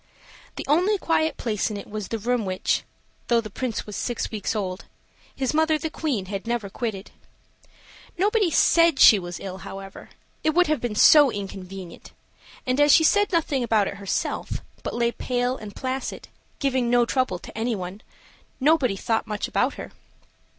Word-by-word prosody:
The - - -5
only 360 +9 +3
quiet 320 -3 0
place 215 -3 -1
in 210 - -5
it 200 - -8
was 210 -2 -5
the 225 - -3
room 240 +2 0
which, 185 -1 0 0.5
though 235 -1 +3
the 215 -2 -6
Prince 245 +1 -3
was 210 - -8
six 240 - -3
weeks 215 0 -3
old, 185 -3 -3 0.5
his 265 0 -1
mother 315 0 +3
the 310 +1 -4
Queen 275 - -2
had 195 +3 -6
never 235 -4 -2
quitted. 215 -4 -5 1.1
Nobody 410 +1 +2
said 335 -1 +4
she 215 -5 +8
was 175 -1 -7
ill, 190 -1 -7
however 195 0 -9 0.3
it 310 0 +1
would 360 0 +5
have 305 -5 0
been 240 -3 -3
so 290 +5 +7
inconvenient; 195 -3 -8 0.5
and 255 +3 +1
as 290 0 +6
she 320 - +6
said 410 +6 +3
nothing 300 -7 +1
about 220 -4 +2
it 200 - -5
herself, 200 -1 -3 0.2
but - - -5
lay 235 0 +1
pale 245 +1 -1
and 210 -5 -10
placid, 260 0 -4 0.3
giving 260 -4 0
no 240 0 +4
trouble 255 -7 0
to - - -12
anybody, 210 -4 -3 0.6
nobody 275 -6 +3
thought 225 +3 -1
much 210 -1 -3
about - - 0
her. - - -8
235 Hz, 170 wpm, -24 LUFS, 200-290 Hz, 1.1 s, she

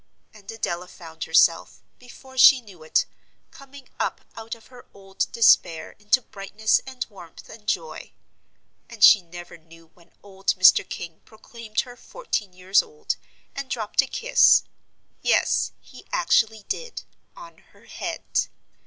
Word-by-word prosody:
And 210 -2 -17
Adela 180 -5 -4
found 160 -3 -9
herself, 165 +1 +2 0.2
before 260 +1 -15
she 265 +1 +8
knew 200 -8 -16
it, 155 - +1 0.5
coming 275 -1 -15
up - - -2
out 225 +1 -7
of 225 - -20
her 250 -1 -16
old 195 -1 -4
despair 170 -8 +3
into 210 +5 +2
brightness 210 +2 -1
and 260 -1 -5
warmth 180 -6 -14
and 215 -1 -14
joy. 480 - -4 0.8
And 230 -3 -5
she 205 - +9
never 175 0 -12
knew 165 0 -19
when 170 -1 -24
old 195 -1 -2
Mr. 185 -1 +5
King 170 -2 -8
proclaimed 220 0 -5
her 245 -1 -12
fourteen 240 - -5
years 185 +2 +2
old, 450 -1 -5 0.4
and 275 -1 -6
dropped 220 -5 0
a - - -6
kiss - - +4 0.6
yes, - - +1
he - - -16
actually 220 - +1
did 480 -1 -5 0.3
on 340 -1 -13
her - - -24
head. - - -3
215 Hz, 145 wpm, -23 LUFS, 180-255 Hz, 0.8 s, she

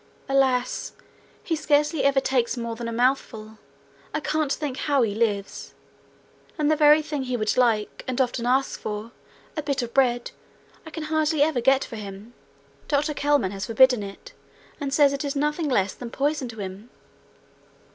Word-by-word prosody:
Alas! 265 -2 +1 0.5
He 330 - -1
scarcely 300 0 +1
ever 280 -1 +4
takes 255 -2 0
more 235 -1 -4
than 235 0 -5
a - - -3
mouthful. 225 -3 -1 0.6
I - - +1
can't 310 -2 -1
think 285 -3 -2
how 280 -4 +2
he 210 -3 0
lives! 205 -3 -2 0.8
And 300 -1 +2
the - - +4
very 300 0 +6
thing 295 -2 -3
he 255 -1 -2
would 215 -1 0
like, 230 -4 +1
and 255 0 -2
often 245 -2 0
asks 265 +2 +1
for 215 +2 -5 0.4
a 310 - -1
bit 280 -3 -1
of 235 - -7
bread 245 -3 +2 0.6
I - - -6
can 320 0 -6
hardly 310 -1 +2
ever 300 -5 +1
get 270 +2 +4
for 230 - -8
him: 205 +2 -9 0.5
Dr 300 +1 +1
Kelman 285 -9 +1
has 195 0 -5
forbidden 250 0 +5
it, 200 - -9 0.5
and 280 -2 -3
says 285 0 +4
it 280 +2 -3
is 285 0 -3
nothing 300 +2 0
less 195 -6 +1
than 245 - -8
poison 285 +1 -1
to 225 -2 -10
him.' 195 +4 -7
265 Hz, 175 wpm, -24 LUFS, 230-295 Hz, 0.8 s, very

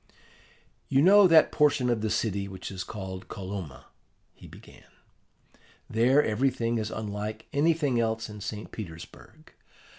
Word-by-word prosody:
"You 135 +2 +3
know 200 +2 +7
that 165 -2 +5
portion 145 -4 +2
of 120 -3 0
the 110 - -1
city 100 -3 -1
which 95 -1 -8
is 95 -1 -5
called 95 -3 -7
Kolomna," 95 -8 -7 0.5
he - - -15
began. - - -16 1.0
"There 125 +6 +3
everything 115 0 0
is 110 -1 -3
unlike 105 0 -5
anything 145 -4 +2
else 110 -1 -1
in 105 -1 -10
St. 105 0 -6
Petersburg. 85 -7 -11
110 Hz, 130 wpm, -27 LUFS, 100-130 Hz, 1.0 s, know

